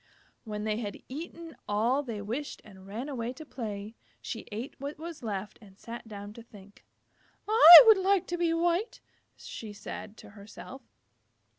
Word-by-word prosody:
When 210 -1 -5
they 215 0 -1
had 210 -4 -6
eaten 330 +3 -8
all 230 +7 +1
they 225 -7 -6
wished 250 +8 -5
and 190 -2 -15
ran 225 +7 -6
away 245 -4 -4
to 310 +4 -11
play, 215 -6 -7 0.3
she 225 - -7
ate 225 +6 -6
what 280 +2 -6
was 330 +1 -9
left 210 -3 -6
and 195 -3 -18
sat 235 +1 -10
down 205 -1 -9
to 230 - -12
think. 205 -3 -17 0.6
"I 350 -5 +11
would 440 -3 +7
like 385 -1 +2
to 350 - -2
be 340 -1 +1
white," 345 +6 -1 0.4
she 215 -2 -9
said 210 +1 -9
to - - -14
herself. 215 +6 -12
230 Hz, 165 wpm, -28 LUFS, 210-315 Hz, 0.6 s, I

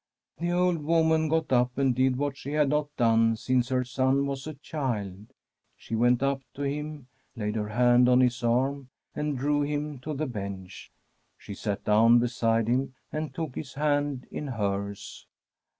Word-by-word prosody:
The 170 +1 -1
old 175 -3 +1
woman 160 0 +2
got 160 -3 0
up 125 0 +2
and 135 -2 +2
did 130 +1 +2
what 140 +1 -2
she 140 +1 -7
had 150 -2 +3
not 150 0 +1
done 115 -1 +3
since 125 +2 0
her 130 -1 +1
son 130 +2 +1
was 140 +1 -4
a 155 - -6
child. 110 - -4 0.5
She - - -10
went 120 +3 +3
up 140 0 0
to 145 - -4
him, 150 0 -4 0.3
laid 105 -3 -2
her 105 -1 -2
hand 120 +2 +4
on 125 0 +5
his 125 -1 +2
arm, 130 +3 0 0.2
and 150 -2 -2
drew 145 +3 +1
him 145 -1 -2
to 150 +4 -5
the 155 +3 -1
bench. 100 -7 -7 0.5
She - - -9
sat 100 0 -4
down 115 +3 +5
beside 115 -2 +1
him 130 +2 0 0.2
and 155 0 -3
took 160 -5 -4
his 130 -1 -7
hand 145 -2 0
in 150 - -5
hers. 100 -4 -4
130 Hz, 175 wpm, -27 LUFS, 115-145 Hz, 0.5 s, on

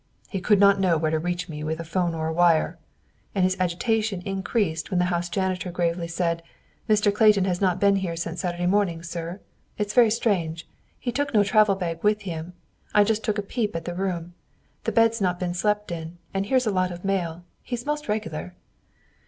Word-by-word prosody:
"He 195 - -3
could 205 +2 +4
not 200 -1 +6
know 180 -4 +3
where 155 0 0
to 160 - +1
reach 175 +2 -2
me 150 -3 -6
with 160 +1 -2
a - - -3
'phone 170 0 -1
or 160 0 -2
a 160 - -1
wire," 170 0 +3 0.6
and 190 - +2
his 185 0 +2
agitation 195 +2 0
increased 195 -3 -1
when 185 - 0
the 180 - +3
house 175 0 -1
janitor 185 0 -1
gravely 170 -1 -1
said, 170 0 -1 0.5
"Mr. 210 -1 +4
Clayton 210 -3 +5
has 180 -1 -1
not 185 -2 +2
been 200 0 +4
here 180 -3 -2
since 170 +1 -4
Saturday 175 -1 -2
morning, 180 -3 +1
sir. 170 +2 -5 0.4
It's 210 0 -2
very 240 -3 +6
strange. 180 -8 0 0.3
He 245 - -3
took 285 0 -1
no 205 - +6
travel 210 -1 +4
bag 170 -3 -4
with 210 0 +3
him. 170 -1 -5 0.4
I 210 - +7
just 220 +1 0
took 215 -1 0
a 205 - -1
peep 210 -1 -2
at 165 0 -4
the 175 - -3
room. 175 -2 -3 0.5
The - - +1
bed's 230 -1 +3
not 180 -2 +1
been 180 -1 -2
slept 210 +2 0
in, 165 0 -6 0.2
and 195 +1 -1
here's 255 +1 +2
a 215 - +1
lot 185 -1 +1
of 175 +2 -8
mail. 175 -3 -1 0.2
He's 245 -1 -5
most 300 0 -2
regular. 90 - -3
185 Hz, 210 wpm, -25 LUFS, 170-210 Hz, 0.6 s, I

